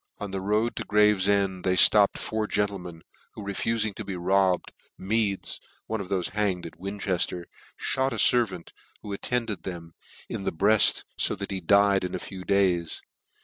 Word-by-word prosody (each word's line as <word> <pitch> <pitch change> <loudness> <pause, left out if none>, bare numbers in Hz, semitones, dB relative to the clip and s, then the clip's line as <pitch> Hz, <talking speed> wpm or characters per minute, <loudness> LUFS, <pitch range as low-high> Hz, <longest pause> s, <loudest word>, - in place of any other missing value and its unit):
On 100 -1 -6
the 95 -1 -3
road 105 +4 0
to - - -2
Gravefend 100 -2 +2
they 95 - +1
Hopped 100 +2 +6
four 110 -1 -2
gentlemen, 95 -6 -3 0.3
who 105 - -8
refufing 110 +2 -1
to 110 - -7
be 100 -2 -5
robbed, 95 +1 +1 0.3
Meads 100 0 -1 0.3
(one 110 -2 -3
of 95 - -7
thofe 95 -2 -2
hanged 100 -4 -1
at 85 - -10
Winchefter,) 95 -2 -2 0.5
fhot 130 +1 +1
a - - -3
fervant 110 -8 +2 0.3
who 100 - -6
attended 115 0 -2
them, 85 -3 -8 0.3
in - - -5
the - - -1
bread, 105 +5 +4 0.2
fo - - +3
that 100 0 -6
he 95 -1 -3
died 100 +2 +4
in 90 - -3
a - - -1
few 95 -2 -8
days. 90 -4 0
100 Hz, 170 wpm, -26 LUFS, 95-105 Hz, 0.5 s, Hopped